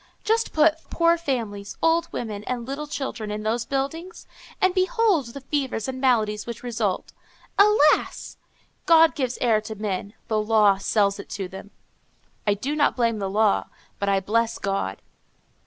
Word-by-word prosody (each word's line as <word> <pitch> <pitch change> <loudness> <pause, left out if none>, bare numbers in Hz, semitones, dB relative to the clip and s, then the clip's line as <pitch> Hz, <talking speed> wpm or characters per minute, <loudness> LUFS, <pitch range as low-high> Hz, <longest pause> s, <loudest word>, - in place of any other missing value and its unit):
Just 450 +1 +1
put 310 +1 +4
poor 335 0 +3
families, 230 -11 -4
old 330 +1 +2
women 210 -3 -5
and 245 -2 -3
little 285 +3 -4
children, 265 -7 -4
in 210 0 -4
those 230 +2 -1
buildings, 300 +7 -4 0.3
and 375 -1 +3
behold 375 - +2
the 275 +4 -9
fevers 270 -5 -2
and 260 0 -5
maladies 215 -5 +1
which 235 0 -7
result! 220 -6 -2 0.5
Alas! 400 -8 +3 0.5
God 325 -1 +6
gives 255 -4 -2
air 225 -3 +3
to 220 0 -7
men; 205 0 -4
the 215 -2 +1
law 210 -2 +4
sells 200 0 +1
it - - -9
to 195 -2 -4
them. 190 +2 -10 0.8
I 205 - +3
do 270 +9 -3
not 295 -1 +2
blame 230 -3 +1
the 195 -1 -2
law, 210 +1 +2 0.3
but 200 - 0
I 195 -1 +3
bless 230 +3 0
God. 195 - -3
235 Hz, 160 wpm, -24 LUFS, 210-300 Hz, 0.8 s, God